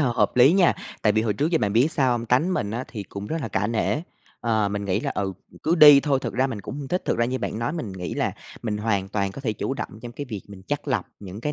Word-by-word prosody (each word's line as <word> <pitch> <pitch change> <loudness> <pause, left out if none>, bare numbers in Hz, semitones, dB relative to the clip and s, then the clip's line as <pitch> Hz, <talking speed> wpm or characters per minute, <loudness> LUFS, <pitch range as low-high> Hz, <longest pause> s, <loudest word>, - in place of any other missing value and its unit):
h 145 - +3
hợp 125 - +1
lý 130 +5 +7
nha, 185 -2 +5 0.3
tại 105 - +4
vì 110 - +2
hồi 110 -2 +1
trước 150 +10 0
giờ 165 - +3
bạn 105 -6 0
biết 130 +9 +3
sao 130 -5 +2
hông? 120 -1 -2
Tánh 155 +11 +2
mình 100 - -1
á 120 +4 -3
thì 110 -4 -6
cũng 100 +1 -7
rất 160 - -2
là 115 - -3
cả 95 +2 0
nể, 115 -1 0 0.4
ờ, 110 -3 +1
mình 100 0 -3
nghĩ 100 +1 0
là, - - -2
ừ, 95 -1 -2 0.3
cứ 165 - +2
đi 150 -4 +9
thôi, 140 -2 +1
thực - - -3
ra 130 +2 +2
mình 115 -6 -5
cũng 115 - -7
hông 140 -2 -6
thích. 180 +4 -1
Thực - - 0
ra 120 - +3
như 130 +2 -1
bạn 110 - -3
nói 115 +5 -1
mình 120 - -4
nghĩ 90 -1 -5
là - - 0 0.3
mình 110 -3 -2
hoàn 105 -3 -1
toàn 100 -1 -1
có 140 - -8
thể 120 -5 -1
chủ 135 +5 -3
động - - -4
trong 120 -1 -7
cái 145 - -5
việc 105 -5 -5
mình 95 -2 -11
chắt - - -2
lọc - - 0 0.2
những 100 +1 -8
cái 150 +5 -2
115 Hz, 305 wpm, -24 LUFS, 105-135 Hz, 0.4 s, đi